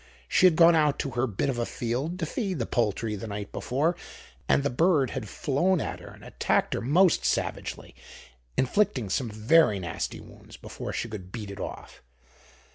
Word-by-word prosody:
She 185 - +5
had 170 - +3
gone 170 +1 +7
out 150 -3 +3
to 140 - -3
her 120 +2 0
bit 110 +5 -2
of 130 -3 -1
a 120 - 0
field 130 +9 -3
to 170 - -2
feed 195 - -3
the 115 - -1
poultry 110 -2 -1
the 105 +3 -6
night 100 -1 -6
before, 150 +7 0 0.5
and 140 - +4
the 140 - 0
bird 150 -1 +2
had 105 - -5
flown 165 - +1
at - - -4
her - - -12
and - - -13
attacked - - 0
her - - -2
most 165 +8 +3
savagely, - - -2 0.6
inflicting 130 - +1
some 120 +1 0
very 110 +3 +4
nasty 85 -3 -4
wounds - - -14
before - - -7
she - - -3
could 95 -5 -8
beat 105 -3 -6
it 100 - -9
off. - - -8
130 Hz, 190 wpm, -27 LUFS, 110-165 Hz, 0.6 s, gone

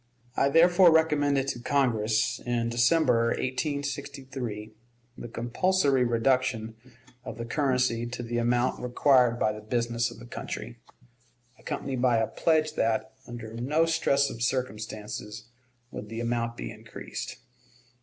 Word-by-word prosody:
I 140 - +3
therefore 175 +3 +6
recommended 145 -4 +2
to 120 - -3
Congress, 115 -5 +1
in 120 -1 -1
December, 120 0 +3
1863, 130 -5 -4 0.4
the - - -8
compulsory 135 +4 +1
reduction 120 -1 +1 0.5
of - - -7
the 115 - -5
currency 125 -3 0
to 120 0 -6
the 120 0 -2
amount 120 +1 +1
required 125 -1 +3
by 110 - +1
the 105 0 -8
business 120 +1 -1
of - - -12
the 120 - -11
country, 120 0 -7 0.8
accompanied 130 -3 -4
by 125 -2 +4
a 110 - +2
pledge 155 +2 +1
that, 110 -4 0
under 115 -2 -8
no 140 +8 +1
stress 140 -4 +2
of 115 - -8
circumstances, 110 -3 -4 0.4
would 105 - -7
the 115 0 -5
amount 115 0 -2
be - - -5
increased. - - -8
120 Hz, 130 wpm, -27 LUFS, 115-140 Hz, 0.8 s, therefore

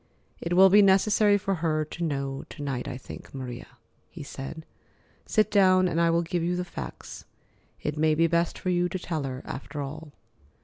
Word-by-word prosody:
"It 170 - -2
will 190 +1 +7
be 205 +1 +8
necessary 205 +1 +4
for 195 0 -1
her 155 -2 +1
to 165 +3 -6
know 140 -3 -2
to 145 - -8
night, 135 -3 -3
I 125 - -5
think, 130 - -11
Maria," 125 -1 -6 0.4
he 165 - -9
said. 140 +3 -8 0.6
"Sit 215 -1 +2
down 185 -2 +5
and 170 -1 0
I 170 - +4
will 170 +1 +2
give 175 +1 -2
you 175 +2 0
the 180 0 -2
facts. 70 - -8 0.6
It 150 0 -3
may 155 0 +3
be 165 +2 +3
best 170 0 +1
for 185 - -3
you 175 0 +1
to 185 - -3
tell 170 -3 -3
her, 130 -1 -5
after 145 +2 -7
all." 150 +2 -6
165 Hz, 195 wpm, -27 LUFS, 145-180 Hz, 0.6 s, be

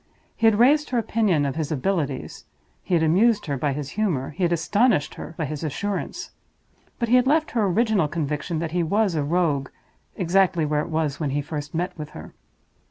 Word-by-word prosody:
He 225 - +3
had 220 -2 +4
raised 290 +6 +4
her 250 - 0
opinion 210 -9 +1
of 140 -1 -2
his 160 -2 -2
abilities; 150 -2 -2 0.4
he 180 - 0
had 165 - +2
amused 205 +7 +3
her 145 - -2
by 140 +2 -1
his 140 0 -5
humor; 170 -12 -1
he 155 - -9
had 175 -1 +2
astonished 200 - +2
her 165 - -9
by 160 - -1
his 150 +2 -5
assurance; 200 - -4 0.7
but 235 - -1
he 245 +2 +5
had 250 +1 +2
left 310 +2 +2
her 220 -4 +1
original 210 -3 +2
conviction 155 +1 -3
that 160 0 -3
he 175 +1 0
was 200 +4 +1
a 155 - 0
Rogue 150 -4 0 0.5
exactly 180 -3 +2
where 150 0 0
it 165 - -6
was 155 -3 -1
when 150 -3 -1
he 145 +2 -1
first 150 0 -6
met 175 +2 -2
with 150 -1 -6
her. - - -10
170 Hz, 205 wpm, -24 LUFS, 150-210 Hz, 0.7 s, he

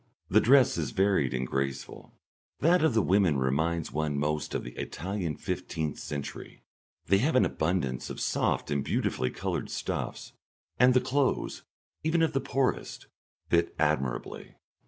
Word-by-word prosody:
The - - +6
dress 130 +1 +5
is - - -1
varied 95 - +2
and 65 0 -1
graceful; 70 +1 -4 0.4
that 170 +3 +4
of 160 -7 +3
the 110 - +4
women 95 -6 +3
reminds 80 +5 0
one 75 0 -1
most 75 +1 -1
of - - -2
the - - -7
Italian 90 +3 -4
fifteenth 75 0 -3
century; 70 -1 -7 0.4
they 95 - +4
have 140 +7 +1
an 130 - +5
abundance 80 -7 -1
of - - -6
soft - - 0
and 70 -1 0
beautifully 65 - 0
coloured - - -3
stuffs, - - -4 0.5
and 125 +1 +6
the 130 - +5
clothes, 140 0 0 0.4
even 165 +1 +2
of 160 - +1
the 135 - +1
poorest, 135 0 -1 0.4
fit 85 0 +2
admirably. 70 -5 -1
85 Hz, 150 wpm, -29 LUFS, -, 0.5 s, The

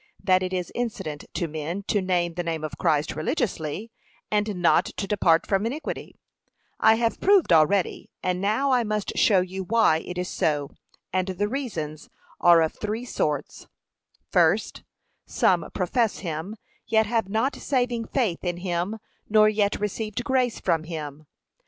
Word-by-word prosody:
That 185 -2 +4
it 185 0 -2
is 180 -1 -3
incident 205 -11 -4
to 170 - -1
men 160 +5 -4
to 205 0 0
name 175 -2 0
the 175 - -2
name 165 -2 -3
of 155 - -6
Christ 155 -4 +1
religiously, 200 - -2 0.4
and 210 -1 0
not 175 -1 +3
to 200 - -4
depart 180 -5 +3
from 195 0 +1
iniquity, 270 +8 -4 0.6
I 220 - +6
have 230 0 -1
proved 390 - +4
already, 165 +4 +2
and 180 0 -1
now 220 +8 +1
I 250 -2 +3
must 215 -2 -2
show 195 -4 +4
you 190 +1 -4
why 210 -6 +3
it 180 +2 -7
is 180 0 -2
so, 145 -5 -1 0.4
and 185 0 +1
the 190 +2 -1
reasons 180 - -5 0.3
are 170 -1 +6
of 160 - -1
three 220 +3 -4
sorts: 150 - -3 0.6
First, - - +2 0.5
Some 175 -4 +2
profess 220 +4 0
him, 170 +3 -5 0.3
yet 220 -1 +3
have 225 -2 -1
not 225 +7 0
saving 245 -4 -1
faith 225 -11 -1
in 175 -1 -2
him, 175 +3 -2 0.3
nor 215 0 +6
yet 210 -1 +1
received 210 +1 -3
grace 260 -4 +1
from 160 -1 0
him. 155 -2 -7
190 Hz, 160 wpm, -25 LUFS, 170-220 Hz, 0.6 s, I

